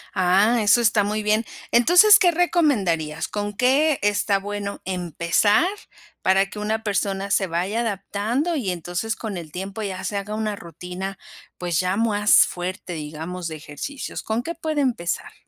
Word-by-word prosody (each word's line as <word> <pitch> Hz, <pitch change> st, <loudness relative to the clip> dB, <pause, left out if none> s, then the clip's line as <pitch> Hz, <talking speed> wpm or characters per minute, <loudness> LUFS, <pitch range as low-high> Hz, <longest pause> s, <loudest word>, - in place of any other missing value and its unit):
Ah, 195 Hz, +6 st, +3 dB
eso 210 Hz, +3 st, +5 dB
está 220 Hz, -3 st, +3 dB
muy 210 Hz, +1 st, -2 dB
bien. 215 Hz, +2 st, +2 dB, 0.3 s
Entonces, 355 Hz, -, +7 dB
¿qué 360 Hz, -, +5 dB
recomendarías? 225 Hz, -, +1 dB
¿Con 205 Hz, 0 st, -4 dB
qué 270 Hz, +6 st, +3 dB
está 205 Hz, -1 st, +2 dB
bueno 200 Hz, 0 st, -5 dB
empezar?, 180 Hz, -, +1 dB, 0.5 s
para 190 Hz, +1 st, +3 dB
que -, -, -10 dB
una 215 Hz, +1 st, -2 dB
persona 200 Hz, -1 st, -1 dB
se 195 Hz, 0 st, +2 dB
vaya 185 Hz, +7 st, -1 dB
adaptando 225 Hz, -, -2 dB
y 245 Hz, -10 st, -2 dB
entonces, 175 Hz, +6 st, -3 dB
con 220 Hz, -4 st, -5 dB
el 165 Hz, -4 st, -7 dB
tiempo, 195 Hz, +5 st, -6 dB
ya 190 Hz, -3 st, -4 dB
se 205 Hz, -, -3 dB
haga 200 Hz, +1 st, -3 dB
una 215 Hz, -1 st, -2 dB
rutina, 180 Hz, +2 st, -7 dB, 0.4 s
pues, 175 Hz, -3 st, -1 dB
ya 185 Hz, +1 st, -1 dB
más 210 Hz, -2 st, +4 dB
fuerte, 180 Hz, 0 st, -5 dB
digamos, 160 Hz, +3 st, -6 dB
de 160 Hz, -, -6 dB
ejercicios, 155 Hz, -, -7 dB
¿con 220 Hz, +2 st, -1 dB
qué 335 Hz, +7 st, -5 dB
puede 315 Hz, -2 st, -2 dB
empezar? 230 Hz, -11 st, -2 dB
205 Hz, 160 wpm, -23 LUFS, 180-225 Hz, 0.5 s, Entonces